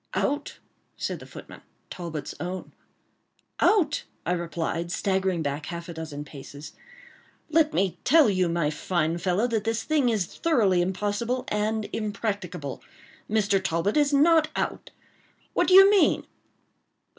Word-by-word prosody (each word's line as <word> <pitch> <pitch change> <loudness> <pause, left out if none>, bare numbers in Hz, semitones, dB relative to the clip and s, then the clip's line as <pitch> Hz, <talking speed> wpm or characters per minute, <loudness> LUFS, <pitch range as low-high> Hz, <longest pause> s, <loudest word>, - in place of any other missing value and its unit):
"Out," 290 +1 -1 0.4
said - - -3
the - - -12
footman—Talbot's 165 -4 -9
own. 180 +3 -5 0.9
"Out!" 410 -7 +2 0.2
I 175 - 0
replied, 170 0 -2
staggering 190 -3 0
back 145 +2 -3
half 170 -1 -6
a 170 - -6
dozen 155 -3 -6
paces—"let 305 - -5
me 185 -2 0
tell 310 0 +6
you, 185 -4 +1
my 165 -3 0
fine 165 +1 -1
fellow, 185 +5 +1
that 220 -3 0
this 225 0 -1
thing 295 -5 +2
is 215 -5 +1
thoroughly 210 - +2
impossible 205 +7 -1
and 215 +1 -1
impracticable; 200 - -4 0.5
Mr. 205 -3 +1
Talbot 180 +3 0
is 295 -1 +3
not 315 +2 +5
out. - - -3 0.6
What - - +2
do 370 - +5
you 390 +1 +10
mean?" 405 -1 +3
195 Hz, 130 wpm, -26 LUFS, 170-250 Hz, 0.9 s, you